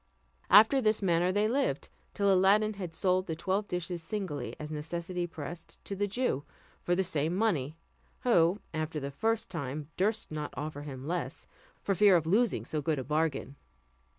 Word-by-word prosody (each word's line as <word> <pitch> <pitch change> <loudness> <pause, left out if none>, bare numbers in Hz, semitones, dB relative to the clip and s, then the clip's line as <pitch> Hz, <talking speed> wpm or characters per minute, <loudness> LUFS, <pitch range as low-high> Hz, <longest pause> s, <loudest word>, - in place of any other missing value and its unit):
After 220 +8 +7
this 215 -2 +2
manner 175 0 +3
they 205 +2 +2
lived, 270 +5 0 0.3
till 200 -1 +3
Aladdin 205 +3 +4
had 180 -5 -6
sold 185 +2 +1
the 160 - -2
twelve 195 +5 -1
dishes 180 -1 -3
singly, 180 -4 -4
as 150 0 -6
necessity 170 +3 -3
pressed, 165 +1 -8
to 200 - -4
the 205 +1 0
Jew, 205 - -1 0.4
for 175 - +1
the 190 - +2
same 160 -1 0
money; 165 -9 0 0.4
who, 185 -5 +3
after 155 0 -2
the 140 0 -5
first 225 +6 -1
time, 145 -2 -4
durst 215 +2 0
not 150 -1 -5
offer 150 -1 -4
him 135 -3 -7
less, 175 +1 -3 0.4
for 200 - +1
fear 200 0 +6
of 165 -2 +2
losing 215 +7 +2
so 155 - -2
good 155 +1 0
a 130 - -3
bargain. 150 -1 -1
175 Hz, 175 wpm, -30 LUFS, 155-205 Hz, 0.4 s, After